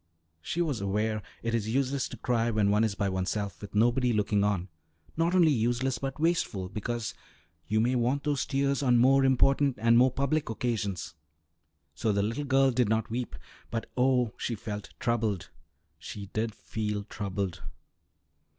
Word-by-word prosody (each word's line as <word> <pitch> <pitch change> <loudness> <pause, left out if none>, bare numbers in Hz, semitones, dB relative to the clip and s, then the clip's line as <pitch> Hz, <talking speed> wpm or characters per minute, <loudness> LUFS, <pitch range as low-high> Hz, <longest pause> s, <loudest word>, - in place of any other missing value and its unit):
She 175 - -1
was 145 -10 -2
aware 105 +2 0 0.2
it 115 0 -1
is 110 -2 0
useless 135 +2 0
to - - -8
cry 120 -2 0
when 105 -3 +2
one 105 +2 +3
is 110 -3 0
by 100 -1 0
oneself 95 +1 -2
with 100 0 -9
nobody 120 +3 +3
looking 105 -2 +1
on; 100 -3 0 0.5
not 170 +3 +1
only 170 -4 +6
useless 120 0 0
but 135 +1 -4
wasteful, 155 - 0
because 115 +2 -3 0.5
you 110 +1 +1
may 120 +3 +2
want 125 +3 +1
those 145 -3 0
tears 140 0 +1
on 125 -3 +4
more 135 +3 +5
important 135 +1 +3
and 115 +1 +5
more 130 +1 +6
public 140 +3 -1
occasions. 110 -7 -2 0.8
So 105 +10 0
the 100 0 +1
little 115 +8 -2
girl 135 0 +4
did 125 -3 +1
not 110 0 0
weep, 120 - -3 0.3
but, 115 -1 -4
oh! 125 -3 +2
she 120 - -2
felt 105 -1 -6
troubled. 110 -6 -1 0.5
She 100 -2 -8
did 110 0 -1
feel 105 -2 -3
troubled. 100 -4 -4
115 Hz, 165 wpm, -29 LUFS, 105-130 Hz, 0.8 s, only